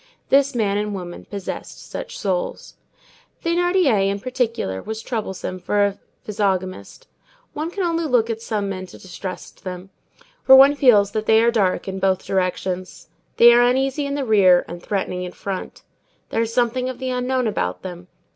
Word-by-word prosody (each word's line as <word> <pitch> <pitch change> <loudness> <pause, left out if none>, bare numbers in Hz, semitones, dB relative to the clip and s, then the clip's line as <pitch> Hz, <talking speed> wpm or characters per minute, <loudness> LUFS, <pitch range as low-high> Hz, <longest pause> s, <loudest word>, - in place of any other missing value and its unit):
This 275 0 +3
man 205 -3 +1
and 210 -1 -3
woman 175 -2 -8
possessed 200 -2 -7
such - - -7
souls. - - -3 0.7
Thénardier, 335 - +2
in 200 +1 -2
particular, 230 - -2
was 220 0 -6
troublesome 190 -5 -4
for 205 +2 +1
a 200 0 -3 0.2
physiognomist. 195 - -3 0.5
One 310 +2 -3
can 380 +2 -3
only 335 -1 0
look 245 -6 +2
at 225 -1 -4
some 210 -3 -2
men 185 -1 -5
to - - -13
distrust 185 0 -8
them; 185 0 -7 0.5
for 265 - +8
one 275 +2 +8
feels 225 -8 +4
that 215 0 -3
they 220 0 +6
are 235 - +4
dark 200 -6 0
in 190 0 -4
both 190 -1 +1
directions. 185 -1 -3 0.3
They 235 0 +8
are 240 - +6
uneasy 265 +3 +1
in 280 - -3
the 280 -2 -2
rear 190 -5 +5
and 175 +1 -8
threatening 190 -2 -2
in 180 -1 -6
front. 195 -2 -6 0.5
There - - 0
is 230 0 -1
something 250 +1 0
of 255 - -6
the 260 0 -3
unknown 250 0 0
about 215 - -2
them. 180 -1 -8
220 Hz, 175 wpm, -21 LUFS, 190-260 Hz, 0.7 s, for